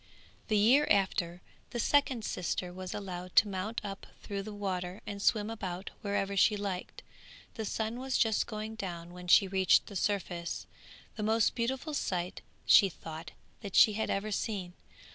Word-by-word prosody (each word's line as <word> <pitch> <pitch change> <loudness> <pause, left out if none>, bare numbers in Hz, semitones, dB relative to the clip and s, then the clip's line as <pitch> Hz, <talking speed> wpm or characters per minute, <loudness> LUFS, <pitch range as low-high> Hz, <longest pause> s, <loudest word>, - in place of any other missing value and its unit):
The 215 - +2
year 250 +8 +5
after, 180 -3 +1 0.3
the 240 - -4
second 260 -3 +2
sister 180 0 -2
was 185 0 -6
allowed 185 -3 -6
to 210 - +7
mount 200 +3 -3
up 195 -1 -6 0.2
through 200 -1 -3
the 215 +2 -7
water 190 -2 -3
and 200 -1 -5
swim 210 0 +2
about 190 -4 -5
wherever 200 -2 -1
she 210 +2 +4
liked. 195 -3 -5 0.5
The 220 - -4
sun 220 +3 -2
was 265 0 -1
just 220 -2 +2
going 215 0 -5
down 175 -5 -6
when 180 0 -9
she 195 +2 +6
reached 190 -1 +4
the 200 - -10
surface, 180 -3 -2 0.5
the - - -3
most 220 +1 +2
beautiful 265 +6 -2
sight, 180 -9 -2 0.2
she 195 - +7
thought, 160 -1 -8 0.3
that 200 -4 -6
she 215 - +7
had 220 +1 -2
ever 210 +2 -1
seen. 195 -4 -2
200 Hz, 165 wpm, -31 LUFS, 180-220 Hz, 0.5 s, to